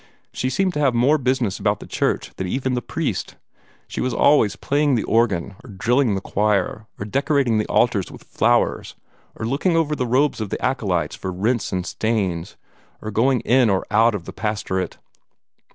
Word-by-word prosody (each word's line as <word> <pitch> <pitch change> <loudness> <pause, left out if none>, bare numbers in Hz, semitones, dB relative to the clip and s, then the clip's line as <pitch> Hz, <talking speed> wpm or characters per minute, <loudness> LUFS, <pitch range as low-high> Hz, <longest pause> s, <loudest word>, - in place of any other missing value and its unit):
She 130 - -1
seemed 185 +5 0
to 150 - -2
have 135 -4 +2
more 135 +6 +3
business 130 -6 0
about - - 0
the - - -9
church - - -1
than 95 - -3
even 130 +6 -1
the 125 - -1
priest. - - -3 0.5
She - - -4
was 130 - -1
always 115 -8 +4
playing 145 +2 +1
the 110 - 0
organ, 105 -6 +1
or 130 - -13
drilling 115 +4 +1
the 95 - -3
choir, 105 +1 0
or 105 - -5
decorating 135 -1 +1
the 105 - -1
altars 110 -6 +1
with - - -12
flowers, - - +1 0.4
or - - -5
looking 145 +9 +1
over 155 -2 +1
the 125 -3 -2
robes 130 +1 +1
of 105 - -3
the - - -3
acolytes 95 - -1
for 95 - -5
rents 110 +6 -1
and 90 -2 -2
stains, 100 -6 -2 0.4
or 110 - -6
going 125 +4 +2
in 125 -1 +3
or 95 -2 +1
out 110 +1 +4
of 90 -4 -6
the - - -8
pastorate. 95 -4 -3
115 Hz, 185 wpm, -22 LUFS, 100-130 Hz, 0.5 s, always